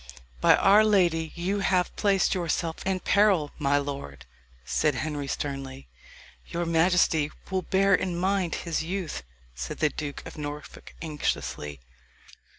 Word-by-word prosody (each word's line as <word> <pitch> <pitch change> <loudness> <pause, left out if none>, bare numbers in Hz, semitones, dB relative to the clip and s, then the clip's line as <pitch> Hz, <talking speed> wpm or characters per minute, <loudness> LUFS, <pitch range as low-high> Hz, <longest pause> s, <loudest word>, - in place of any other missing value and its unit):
"By - - +6
our 205 +2 +6
lady 175 -7 +2
you 185 +4 -1
have 185 -2 +1
placed 200 -2 +2
yourself 170 -2 -1
in 190 -1 0
peril, 195 -8 +3
my 140 -1 +2
lord," 140 - -5 0.4
said 150 -3 +1
Henry 145 0 -3
sternly. 135 -1 -5 0.6
"Your 170 0 -2
majesty 165 -2 +3 0.2
will 190 -1 +1
bear 195 +2 +2
in 180 -2 +1
mind 185 -1 0
his 165 -2 -1
youth," 180 -1 -3 0.3
said - - -5
the 155 - +2
Duke 145 -1 -6
of - - -9
Norfolk 145 0 -8
anxiously. 75 - -3
165 Hz, 135 wpm, -27 LUFS, 145-190 Hz, 0.6 s, By